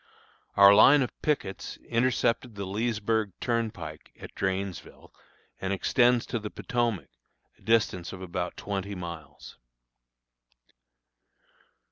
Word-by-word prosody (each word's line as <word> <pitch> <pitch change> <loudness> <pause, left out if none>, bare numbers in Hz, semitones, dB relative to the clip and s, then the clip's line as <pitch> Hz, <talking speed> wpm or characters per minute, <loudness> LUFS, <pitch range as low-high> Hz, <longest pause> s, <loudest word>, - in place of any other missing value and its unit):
Our 100 0 +9
line 135 +7 +7
of 125 - -4
pickets 135 -11 -2
intercepts 120 0 +1
the 100 -2 -6
Leesburg 110 0 -1
turnpike 115 -2 -3
at - - -10
Drainesville 95 -1 -4 0.5
and 95 - -2
extends 120 +5 +3
to 120 - -3
the 105 -1 -6
Potomac, 120 -6 -2 0.5
a - - -27
distance 110 -6 +1
of 95 - -8
about 90 -1 -4
twenty 100 0 -4
miles. 85 -5 -9
105 Hz, 105 wpm, -28 LUFS, 95-115 Hz, 0.5 s, Our